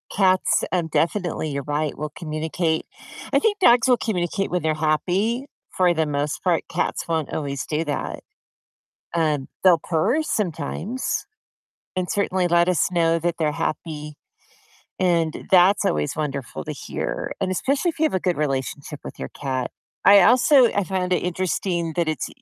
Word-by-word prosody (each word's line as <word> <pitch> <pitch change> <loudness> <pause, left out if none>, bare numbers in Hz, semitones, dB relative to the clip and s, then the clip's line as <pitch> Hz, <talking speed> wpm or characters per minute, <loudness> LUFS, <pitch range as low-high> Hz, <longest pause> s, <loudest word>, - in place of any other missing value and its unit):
cats, 185 -2 +3
um, 175 -3 0
definitely, 165 -1 -1
you're 140 0 -3
right, 150 +1 -2
will 150 0 -4
communicate. 160 +1 -2 0.5
I - - +5
think 420 -2 +1
dogs 240 -9 +5
will 250 -1 +5
communicate 195 -3 -1
when 180 0 0
they're 155 0 +1
happy, 185 - 0 0.3
for 180 -1 +4
the 160 -1 +1
most 145 0 -2
part, 175 -4 +2
cats - - -2
won't 160 -3 -2
always 140 -3 -3
do 155 +1 -1
that. 145 - -3 1.0
Um, 155 -5 0
they'll 180 -3 +6
purr 195 - +1
sometimes 210 - -2 0.7
and 180 -1 -1
certainly 190 -2 +1
let 175 +1 +3
us 180 -1 +2
know 165 -1 +2
that 170 0 -1
they're 155 -2 +1
happy. 150 -1 -4 0.9
And 170 -3 +1
that's 190 +2 +5
always 75 -1 0
wonderful 140 - -4
to - - -5
hear, - - -4
and 185 -1 0
especially 275 - 0
if 325 - -6
you - - +2
have 315 - +2
a 185 - +1
good 180 -3 0
relationship 145 0 -3
with - - -9
your 65 - -5
cat, 130 -3 -3 0.3
I 200 +1 +9
also 255 +6 +6
I 200 - +1
found 185 -1 -1
it - - +3
interesting 175 -1 -1
that 170 -2 0
it's 155 -4 -2
170 Hz, 165 wpm, -23 LUFS, 155-190 Hz, 1.0 s, I